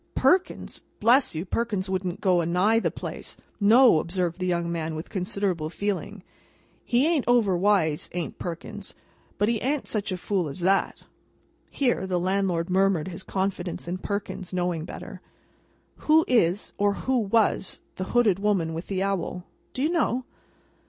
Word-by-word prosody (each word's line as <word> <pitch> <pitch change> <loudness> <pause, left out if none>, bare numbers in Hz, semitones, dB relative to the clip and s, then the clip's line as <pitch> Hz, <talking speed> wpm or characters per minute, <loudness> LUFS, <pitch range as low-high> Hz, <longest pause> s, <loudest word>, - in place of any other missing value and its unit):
"Perkins? 375 +1 +1 0.2
Bless 240 - +4
you, 160 +4 -3
Perkins 205 -1 -2
wouldn't 185 -1 -3
go 185 -3 +3
a - - -2
nigh 195 +6 +3
the - - 0
place. - - -7 0.2
No!" 225 -2 +6
observed 175 +1 -2
the 185 - -1
young 170 -1 0
man, 160 -1 -3
with 155 +2 -7
considerable 185 -4 -1
feeling; 200 +1 -3 0.6
"he 245 +3 +2
an't 320 -5 +1
overwise, 195 -8 +2
an't 175 -2 -4
Perkins, 190 +4 -6 0.4
but 205 - +2
he 230 -1 0
an't 280 +2 -1
such 210 -2 -2
a 185 - -2
fool 180 -3 -1
as 160 +6 -7
that." 195 +2 +1 0.6
(Here, 245 -8 0
the 180 -1 0
landlord 185 -2 0
murmured 190 -3 +2
his 175 0 -8
confidence 190 -2 -3
in 180 +2 -3
Perkins's 200 -2 -4
knowing 175 -3 -1
better.) - - -9 0.8
"Who 315 +1 +4
is—or 205 -2 +2
who 260 -1 +2
was—the 210 -3 0
hooded 215 -4 +2
woman 195 -6 +1
with 165 +2 -6
the 190 -1 -1
owl? 190 -2 -2 0.3
Do 260 - -3
you 310 - +2
know?" 260 -7 0
190 Hz, 150 wpm, -26 LUFS, 175-215 Hz, 0.8 s, No